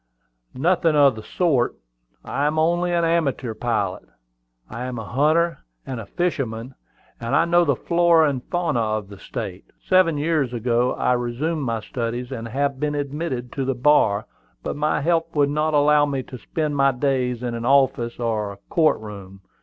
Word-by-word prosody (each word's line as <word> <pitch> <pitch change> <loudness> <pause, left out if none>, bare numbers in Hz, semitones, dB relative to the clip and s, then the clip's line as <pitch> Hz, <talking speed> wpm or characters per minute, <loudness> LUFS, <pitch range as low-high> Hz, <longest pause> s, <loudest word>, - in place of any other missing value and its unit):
"Nothing 165 +2 +2
of 140 -4 +5
the 110 - -7
sort: 140 -4 +1 0.5
I 145 +1 0
am 155 +1 -1
only 175 +2 +2
an 170 -1 +2
amateur 140 -8 0
pilot. 115 +1 -1 0.7
I 120 - -6
am 125 -1 -5
a 110 - -5
hunter 155 +7 +2 0.3
and 130 -3 -5
a 110 - -8
fisherman, 130 - -2 0.5
and 115 0 -1
I 165 - +4
know 175 +1 +4
the 140 -4 +2
flora 170 +1 +3
and 135 -3 -2
the - - -34
fauna 170 -7 0
of 110 -2 -1
the 100 -2 -11
State. - - -6
Seven 185 -4 +3
years 150 -4 0
ago 120 +1 +1
I 125 - +1
resumed 125 +7 -2
my 115 -1 -1
studies, 120 +2 -4
and 115 -3 -5
have 140 +3 -1
been 150 0 -1
admitted 140 -3 -3
to 135 - -3
the 135 0 -1
bar. 120 -6 +3 0.4
But - - -3
my 150 +1 0
health 165 +1 0
would 145 -1 +3
not 155 +1 0
allow 145 0 +4
me 135 -2 -2
to 125 - -9
spend 155 +2 -2
my 140 -1 +4
days 125 -2 -1
in 120 -1 -2
an 115 +1 -3
office 135 -4 +2
or 110 -3 -1
a 100 - -11 0.2
court 160 -2 +3
room. 100 -3 -10
135 Hz, 185 wpm, -22 LUFS, 120-155 Hz, 0.7 s, of